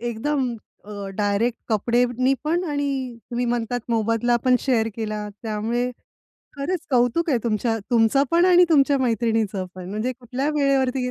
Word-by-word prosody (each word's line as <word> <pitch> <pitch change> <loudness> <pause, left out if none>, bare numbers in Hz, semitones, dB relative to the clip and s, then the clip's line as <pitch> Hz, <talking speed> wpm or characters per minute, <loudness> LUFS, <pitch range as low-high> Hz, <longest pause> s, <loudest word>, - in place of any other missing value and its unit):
एकदम 240 +2 -1 0.3
अ, 210 - -12 0.3
डायरेक्ट 210 +3 0
अ, - - +5
कपडेनी 245 +4 +1
पण 340 +4 0
आणि 275 -4 -2
तुम्ही 245 +1 -1
म्हणतात 240 0 -1
मोबदला 230 +1 +1
पण 255 -1 +5
शेअर 230 -5 +1
केला. 215 -2 -3
त्यामुळे 230 +3 -1 0.7
खरंच 340 +6 -2
कौतुक 250 +7 +2
आहे 255 - +3
तुमच्या 225 0 0
तुमचं 235 +3 +4
पण 340 +1 +4
आणि 360 -1 +6
तुमच्या 285 -3 +4
मैत्रिणीचं 225 -5 0
पण. 185 -1 -8
म्हणजे 215 +5 -2
कुठल्या 255 +3 -4
वेळेवरती 275 -2 +2
गे - - -2
245 Hz, 150 wpm, -23 LUFS, 225-275 Hz, 0.7 s, आणि